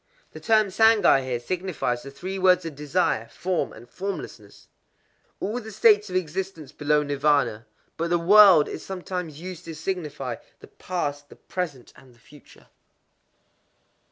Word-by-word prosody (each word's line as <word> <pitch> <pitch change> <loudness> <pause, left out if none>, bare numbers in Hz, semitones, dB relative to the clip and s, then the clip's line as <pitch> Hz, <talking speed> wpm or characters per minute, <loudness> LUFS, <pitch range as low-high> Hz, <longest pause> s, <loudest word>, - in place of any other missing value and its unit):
—The - - -10
term 215 -2 +3
Sangai 220 -9 +5
here 125 -2 -3
signifies 165 -4 -3
the 140 - -9
three 185 +8 -6
worlds 185 -1 +4
of 165 - -5
Desire, 145 -5 -1
Form, 175 +8 -2
and 120 +2 -13
Formlessness,—all 200 - -8
the 220 -2 -9
states 210 0 +4
of 185 - -6
existence 175 -3 -3
below 150 0 +1
Nirvâna. 140 -6 +1 0.3
But 170 +1 -2
the 175 - +3
word 185 -2 +7
is - - -7
sometimes 180 -5 -6
used 180 -1 -8
to 165 -1 -7
signify 150 -8 -4 0.2
the - - -15
Past, 145 -5 -4
the - - -14
Present, 160 -9 -6
and 130 -2 -19
the - - -26
Future. 145 +3 -19
170 Hz, 145 wpm, -25 LUFS, 145-190 Hz, 0.3 s, word